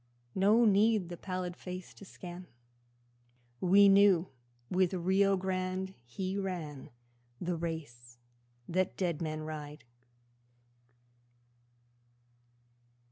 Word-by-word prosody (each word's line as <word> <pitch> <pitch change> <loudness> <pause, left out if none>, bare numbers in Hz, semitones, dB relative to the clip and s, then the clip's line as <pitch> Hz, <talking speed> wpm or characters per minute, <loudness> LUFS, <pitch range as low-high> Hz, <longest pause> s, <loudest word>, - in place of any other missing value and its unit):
No 210 +5 +4
need 210 -2 +3
the 175 - -5
pallid 185 -1 -4
face 180 0 -8
to 200 - -13
scan, 180 -1 -9 1.1
We 200 +3 +6
knew 195 -3 +5 0.4
with 185 +3 +1
Rio 190 +2 +3
Grande 185 0 -2
he 190 +10 -3
ran 170 -8 -5 0.5
The 175 0 -2
race 145 -8 -6 0.5
the 185 +2 +2
dead 175 -4 -3
men 155 -1 -3
ride. 150 -1 -7
185 Hz, 90 wpm, -32 LUFS, 165-190 Hz, 1.1 s, We